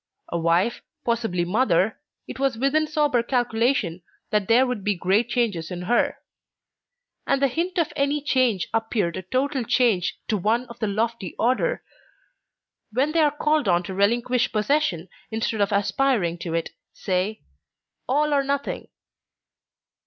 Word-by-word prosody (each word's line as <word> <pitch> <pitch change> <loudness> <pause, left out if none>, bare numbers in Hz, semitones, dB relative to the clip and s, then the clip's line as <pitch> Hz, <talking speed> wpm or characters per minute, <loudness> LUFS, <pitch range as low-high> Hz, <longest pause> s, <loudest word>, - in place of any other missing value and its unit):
A 170 - -2
wife, 170 +7 +1 0.2
possibly 225 -7 0
mother, 210 0 +2 0.3
it - - -8
was 270 -4 +1
within 285 +5 +2
sober 295 -5 +2
calculation 235 -6 0 0.3
that 210 -2 +1
there 240 +3 +5
would 250 -6 -3
be 205 0 +1
great 195 +6 +1
changes 220 -10 -1
in 180 -1 -5
her. 240 +6 +1 1.1
And 275 - +2
the 275 - +3
hint 345 +8 -2
of 335 -3 +1
any 280 +1 +1
change 255 -9 +1
appeared 225 -6 0
a - - -4
total 260 +7 -1
change 220 -6 +1
to 215 - +1
one 225 +6 +1
of 235 0 -11
the 220 - 0
lofty 220 -2 -2
order 255 - +1
who, - - -36
when 285 +3 +2
they 330 - +1
are 305 -2 +5
called 300 -2 0
on 175 -1 +3
to 190 - -6
relinquish 235 +5 +1
possession 215 - 0 0.2
instead 220 -1 -2
of 200 +1 +2
aspiring 200 -3 +1
to 165 -1 -4
it, 165 - -2 0.2
say, 190 +3 -2 0.7
All 295 +3 +2
or 280 -1 +3
nothing! 280 +1 -2
230 Hz, 150 wpm, -24 LUFS, 195-270 Hz, 1.1 s, there